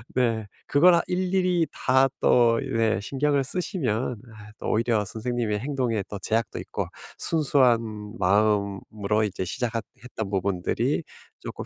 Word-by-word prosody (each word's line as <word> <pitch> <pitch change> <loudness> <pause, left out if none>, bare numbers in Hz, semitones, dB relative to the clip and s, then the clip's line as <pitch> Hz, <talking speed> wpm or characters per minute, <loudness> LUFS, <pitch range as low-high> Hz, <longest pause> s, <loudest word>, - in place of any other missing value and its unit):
네. 115 -4 +1 0.2
그걸 170 +5 +6
아 170 - +3
일일이 180 -2 +1
다 130 +1 +3
또 115 -2 +4
네 110 -2 0
신경을 140 +4 0
쓰시면 130 - -2 0.2
아 105 0 -12
또 - - -5
오히려 110 -1 +2
선생님의 110 0 -2
행동에 125 -6 -1
또 100 - -6
제약도 115 +4 -1
있고 - - -4 0.3
순수한 115 -9 +1
마음으로 100 +1 +1
이제 95 -2 -3
시작하 115 +4 -2 0.2
했던 110 -5 -5
부분들이 95 -2 0 0.4
쪼끔 - - -7
115 Hz, 280 characters per minute, -25 LUFS, 105-135 Hz, 0.4 s, 그걸